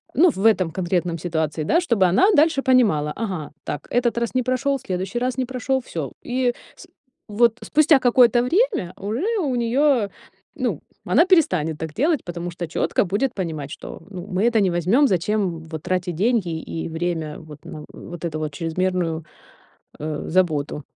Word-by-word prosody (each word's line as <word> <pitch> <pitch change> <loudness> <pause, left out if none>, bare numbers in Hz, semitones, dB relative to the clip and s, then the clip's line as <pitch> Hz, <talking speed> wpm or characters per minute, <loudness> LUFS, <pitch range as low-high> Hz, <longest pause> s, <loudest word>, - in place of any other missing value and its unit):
ну, 340 +8 +6
в 200 -8 -3
этом 190 -7 +4
конкретном 175 -1 -1
ситуации, 160 -2 -2
да. 335 - +3
Чтобы 225 - +2
она 195 - +4
дальше 300 -2 +4
понимала: 210 - +3
ага, 185 -9 -4 0.2
так, 145 - -5
этот 240 -1 +2
раз 235 +1 -3
не 255 - +3
прошёл, 265 +2 0
следующий 190 -1 -3
раз 255 +1 -1
не 260 - 0
прошёл, 260 +1 -1 0.2
всё. 140 -5 -2 0.2
И 250 0 +1 0.2
с - - -14 0.4
вот 230 +2 +2
спустя 310 -1 +4
какое-то 245 -1 +5
время 360 - +1
уже 220 - -3 0.2
у 270 -4 -1
неё, 240 -1 +2 0.5
ну, - - -2 0.2
она 335 - +4
перестанет 180 - +2
так 160 -1 -5
делать, 295 - +1
потому 175 0 -5
что 175 0 -5
чётко 160 - 0
будет 210 +8 0
понимать, 160 - -4
что, - - -9
ну, 185 -3 -6
мы 185 +3 0
это 220 - +5
не 195 - +3
возьмём, 230 - +4
зачем 200 0 +1
вот 160 -1 -8
тратить 180 -2 -1
деньги 210 -1 +1 0.2
и 165 0 -4
время 160 -2 -3
вот 150 -3 -13
на, - - -8
м, 150 - -10
вот 175 -1 -8
эту 155 -2 -3
чрезмерную, 165 +1 -2 0.7
э, 150 0 -4
заботу. 155 -5 0
190 Hz, 170 wpm, -22 LUFS, 165-250 Hz, 0.7 s, ну